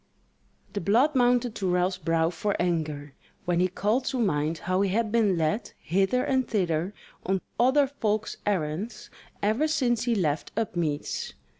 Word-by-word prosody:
The 205 - -2
blood 235 - +3
mounted 245 -2 +3
to 195 -4 -2
Ralph's 180 +1 +1
brow 165 -1 +1
for 200 +3 -1
anger; 155 -5 -1 0.3
when 175 -1 +1
he 180 - +4
called 210 +7 0
to 265 - -1
mind 160 -8 0
how 185 +3 0
he 200 - +2
had 220 +2 0
been 215 -5 +3
led 165 +8 -1
hither 195 +8 +1
and 260 -1 +1
thither 180 -2 0 0.3
on 190 0 0 0.2
other 265 +4 +5
folk's 220 -6 -2
errands 200 +3 -2 0.3
ever 220 +9 +2
since 240 -6 +1
he 240 -2 +2
left 155 -7 -1
Upmeads. 165 - -2
200 Hz, 155 wpm, -27 LUFS, 170-235 Hz, 0.3 s, other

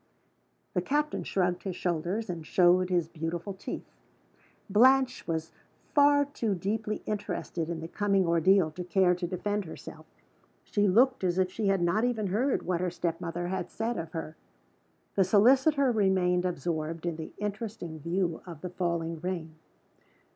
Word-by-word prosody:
The 180 - +1
captain 295 +9 -1
shrugged 180 -2 0
his 190 -3 -4
shoulders, 180 +6 -2
and 170 -3 -5
showed 180 +2 +4
his 175 -3 +1
beautiful 165 +4 -4
teeth. 190 - -6 0.8
Blanche 255 +5 +4
was 160 -1 -2 0.4
far 285 0 +5
too 230 -7 -2
deeply 210 +4 -2
interested 200 -5 -3
in 165 -1 -4
the 165 - -5
coming 195 +1 +1
ordeal 170 0 +4
to 180 +4 -6
care 180 0 +3
to 175 0 -3
defend 205 +3 -2
herself: 160 - -10 0.6
she 205 0 +1
looked 245 +5 +4
as 180 -1 +1
if 185 -1 +1
she 210 +1 -2
had 195 -2 +2
not 190 +6 +2
even 240 -4 0
heard 225 +9 0
what 180 -1 -1
her 180 - 0
step 170 -1 -3
mother 175 +1 -3
had 185 -2 -3
said 230 +2 -2
of 165 -1 -7
her. 160 -1 -5 0.8
The 195 - +4
solicitor 265 - +4
remained 185 -4 +2
absorbed 165 -1 -3
in 170 -2 -2
the 160 - -7
interesting 205 -5 -5
view 170 +1 -1
of 165 -4 -9
the 180 - -5
falling 170 -2 -2
rain. 170 -3 -4
185 Hz, 160 wpm, -29 LUFS, 170-210 Hz, 0.8 s, far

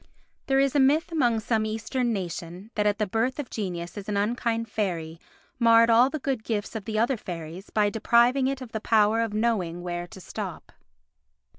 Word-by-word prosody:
There 270 0 +3
is 275 -1 +2
a - - +4
myth 290 +5 +3
among 240 -8 +2
some 220 0 0
Eastern 225 +3 -1
nation 180 0 -5
that 210 -1 +1
at 205 -1 +1
the 215 - +1
birth 225 +6 -1
of 290 -4 -5
Genius 175 -3 -4
an 205 0 -3
unkind 230 +2 0
fairy 170 -7 -3 0.4
marred 230 -1 +6
all 240 +3 +6
the 310 - -3
good 265 -5 -2
gifts 220 -1 -3
of 215 -3 -5
the 220 -1 -3
other 235 +3 +2
fairies 170 0 -7
by 210 -1 +2
depriving 240 +4 +3
it 270 0 -2
of 250 -3 -8
the 220 - -4
power 220 0 +3
of 225 -2 -2
knowing 190 -7 0
where 175 0 -4
to 190 - -12
stop. - - -7
220 Hz, 190 wpm, -26 LUFS, 195-240 Hz, 0.4 s, marred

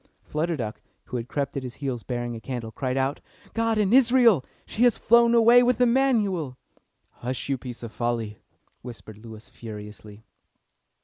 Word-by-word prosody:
Flutter 160 +2 -2
Duck, 110 -4 -5 0.2
who 125 - -5
had 115 0 -5
crept 140 +1 -3
at 140 - -2
his 125 -2 -7
heels 130 -4 -4
bearing 120 -1 -4
a - - -7
candle, 120 -3 -5
cried 130 +2 -3
out, 135 +2 0 0.3
"God 225 -1 0
in 210 0 +2
Israel! 240 - +5 0.2
She 220 - -5
has 245 -1 +5
flown 235 0 +4
away 235 +1 +7
with 245 -1 +2
Emanuel." 225 - +1 0.5
"Hush, 125 +2 -5
you 135 - +1
piece 120 -2 -8
of 115 - -6
folly!" 115 -3 -3 0.4
whispered 110 -3 -10
Lewis 110 -1 -11
furiously. 105 -1 -10
135 Hz, 165 wpm, -25 LUFS, -, 0.5 s, away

